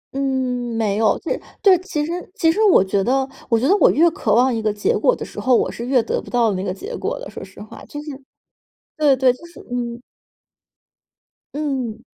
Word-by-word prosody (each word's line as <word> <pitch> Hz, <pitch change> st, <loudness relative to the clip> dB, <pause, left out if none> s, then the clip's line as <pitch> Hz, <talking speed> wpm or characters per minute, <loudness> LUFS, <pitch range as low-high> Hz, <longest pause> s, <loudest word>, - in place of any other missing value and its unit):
嗯， 255 Hz, -3 st, -1 dB
没 210 Hz, -3 st, 0 dB
有。 220 Hz, -1 st, +2 dB
对 -, -, -3 dB, 0.2 s
对， 390 Hz, -2 st, +7 dB
其 310 Hz, -6 st, -3 dB
实 330 Hz, -, -5 dB, 0.2 s
其 325 Hz, -6 st, +3 dB
实 420 Hz, -, -1 dB
我 400 Hz, -, +6 dB
觉 195 Hz, 0 st, 0 dB
得 265 Hz, +3 st, +1 dB, 0.2 s
我 230 Hz, -1 st, +3 dB
觉 260 Hz, -, +1 dB
得 390 Hz, -, +5 dB
我 -, -, +5 dB
越 330 Hz, +3 st, +4 dB
渴 215 Hz, -8 st, 0 dB
望 250 Hz, +1 st, +4 dB
一 225 Hz, -, -2 dB
个 215 Hz, -1 st, +1 dB
结 205 Hz, 0 st, 0 dB
果 -, -, +2 dB
的 -, -, -6 dB
时 -, -, -9 dB
候， 255 Hz, -2 st, +3 dB
我 -, -, +1 dB
是 235 Hz, -, -6 dB
越 255 Hz, -3 st, +3 dB
得 -, -, -2 dB
不 -, -, -13 dB
到 235 Hz, -4 st, +2 dB
那 185 Hz, -, -3 dB
个 190 Hz, -, -2 dB
结 430 Hz, -, -7 dB
果 -, -, -3 dB
的， -, -, -8 dB
说 -, -, -8 dB
实 190 Hz, +1 st, -14 dB
话， 215 Hz, -, -12 dB
就 290 Hz, -, -8 dB
是 300 Hz, -, -7 dB, 0.9 s
对 295 Hz, -3 st, +4 dB
对， 260 Hz, -1 st, +3 dB
就 295 Hz, -, -16 dB
是 340 Hz, -, -15 dB
嗯。 240 Hz, -1 st, -3 dB, 1.5 s
嗯。 260 Hz, -6 st, -3 dB
255 Hz, 235 characters per minute, -20 LUFS, 225-300 Hz, 1.5 s, 对